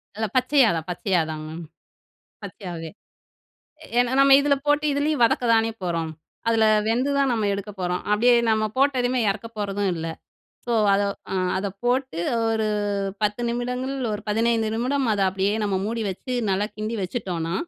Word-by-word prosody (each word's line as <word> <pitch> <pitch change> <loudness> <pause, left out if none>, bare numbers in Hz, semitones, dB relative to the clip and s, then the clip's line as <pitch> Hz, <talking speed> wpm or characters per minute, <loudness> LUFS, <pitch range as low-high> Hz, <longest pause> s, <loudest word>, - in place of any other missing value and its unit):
இல்ல 220 +1 -1
பச்சையாதான், 250 - +3
பச்சையாகதாங்க 160 -4 -1
மேம். 165 +1 -7 0.8
பச்சையாவே! 175 -4 -7 1.1
ஏனா, 245 0 +2
நம்ம 275 0 +7
இதுல 285 0 +3
போட்டு, 295 +1 +2
இதுலயும் 290 -1 0
வதக்கதானே 230 -1 +3
போறோம். 165 -2 -2 0.4
அதில 225 -1 +3 0.2
வெந்து 245 +5 +1
தான் 275 -2 +2
நம்ம 220 -3 0
எடுக்க 200 +1 -5
போறோம். 180 0 -1
அப்பிடியே 240 +4 +5 0.2
நம்ம 215 0 +2
போட்டதுமே 255 -2 +2
இறக்க 200 +3 -3
போறதும் 200 -1 -1
இல்ல. 165 0 -4 0.6
ஸோ, 240 - -1 0.2
அத 200 - +2 0.3
அ - - 0 0.2
அத 190 - -2 0.2
போட்டு 255 -6 0 0.3
ஒரு 220 -1 0 0.6
10 210 +3 0
நிமிடங்கள், 250 +3 -2 0.2
ஒரு 210 - -4
15 225 +1 +1
நிமிடம் 260 +3 0
அத 205 - -1
அப்பிடியே 195 +2 0
நம்ம 200 -2 0
மூடி 230 +1 -2
வச்சு 250 +7 -5 0.2
நல்லா 195 +2 +1
கிண்டி 215 +2 -3
வச்சுட்டோன்னா, 180 -5 -3
220 Hz, 145 wpm, -24 LUFS, 190-250 Hz, 1.1 s, நம்ம